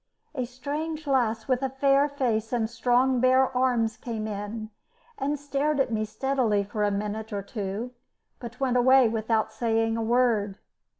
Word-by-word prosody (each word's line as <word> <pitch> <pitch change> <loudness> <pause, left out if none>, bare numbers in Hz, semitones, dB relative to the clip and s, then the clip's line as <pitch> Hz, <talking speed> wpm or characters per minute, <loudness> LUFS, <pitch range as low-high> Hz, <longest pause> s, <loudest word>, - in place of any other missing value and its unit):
A 255 -4 -2
strange 295 +6 -5
lass 235 -5 0
with 255 -1 +1
a 270 - 0
fair 275 +2 +3
face 235 -6 -1
and 235 -3 0
strong 245 +2 +2
bare 260 +1 +3
arms 240 -3 +1
came 220 -2 -5
in 215 +1 -5 0.5
and 285 +1 -1
stared 285 +1 -1
at 265 - +1
me 215 0 0
steadily 235 -3 0
for 210 +1 -3
a 205 - +3
minute 210 +2 -3
or 200 -1 -3
two, 205 +3 -5 0.5
but 235 -1 -9
went 255 -2 +1
away 260 0 +6
without 220 0 0
saying 225 -1 0
a - - -1
word. 225 -4 +1
240 Hz, 165 wpm, -26 LUFS, 220-265 Hz, 0.5 s, away